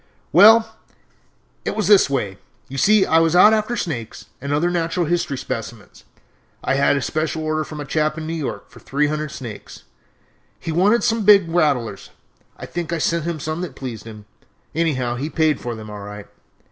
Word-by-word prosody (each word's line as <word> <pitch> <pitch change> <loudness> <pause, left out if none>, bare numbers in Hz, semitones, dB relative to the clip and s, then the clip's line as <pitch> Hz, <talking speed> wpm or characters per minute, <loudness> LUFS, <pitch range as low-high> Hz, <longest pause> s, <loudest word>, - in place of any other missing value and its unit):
"Well, 220 +5 +6 0.9
it - - -3
was 215 - -1
this 200 -7 +6
way: 105 -8 -2 0.3
you 135 0 -5
see 210 +5 +4
I 165 - +4
was 165 +1 +2
out 210 +4 +7
after 220 +2 0
snakes 120 - -5 0.2
and 140 +1 -4
other 160 +5 +1
natural 170 0 -1
history 170 -4 -1
specimens. 115 -3 -7 0.6
I - - 0
had 140 +1 +3
a 140 - -2
special 155 0 -2
order 155 0 -1
from 155 -1 -9
a 145 - -5
chap 155 +2 0
in 160 - -5
New 160 - -4
York 155 -4 -5
for - - -14
three 140 +2 -1
hundred 150 +1 -2
snakes 115 -5 -9 0.8
he 165 - -5
wanted 200 +8 +3
some 230 -2 +1
big 200 -3 +6
rattlers. 140 - 0 0.5
I - - -8
think 170 -2 -5
I 170 - 0
sent 165 +1 0
him 170 -2 -3
some 155 +3 -4
that 165 -8 -6
pleased 125 -6 -7
him; 105 -2 -11 0.5
anyhow 130 -7 -1
he 145 +5 -3
paid 155 -3 +1
for 120 -1 -5
them 110 -1 -9
all 105 -1 -8
right. 105 0 -9
155 Hz, 190 wpm, -21 LUFS, 130-175 Hz, 0.9 s, out